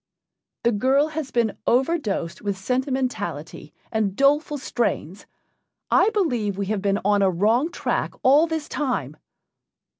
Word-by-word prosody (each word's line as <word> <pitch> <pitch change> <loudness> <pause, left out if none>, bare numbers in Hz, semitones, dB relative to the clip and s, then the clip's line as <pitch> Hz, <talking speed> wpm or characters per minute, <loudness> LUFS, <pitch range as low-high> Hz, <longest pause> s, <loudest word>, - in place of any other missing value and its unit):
The 235 - +3
girl 265 +7 +2
has 310 -3 -4
been 235 -4 0
overdosed 245 - 0
with 200 -2 -2
sentimentality 255 +5 -3 0.2
and 215 -4 0
doleful 290 +3 +2
strains. 210 - -3 0.6
I - - +5
believe 245 - 0
we 200 - -1
have 205 - -2
been 200 0 +1
on 205 0 +3
a 195 - +4
wrong 220 - +2
track 345 - -2
all 290 +5 +5
this 320 -2 -3
time." 245 - -2
245 Hz, 130 wpm, -23 LUFS, 200-290 Hz, 0.6 s, I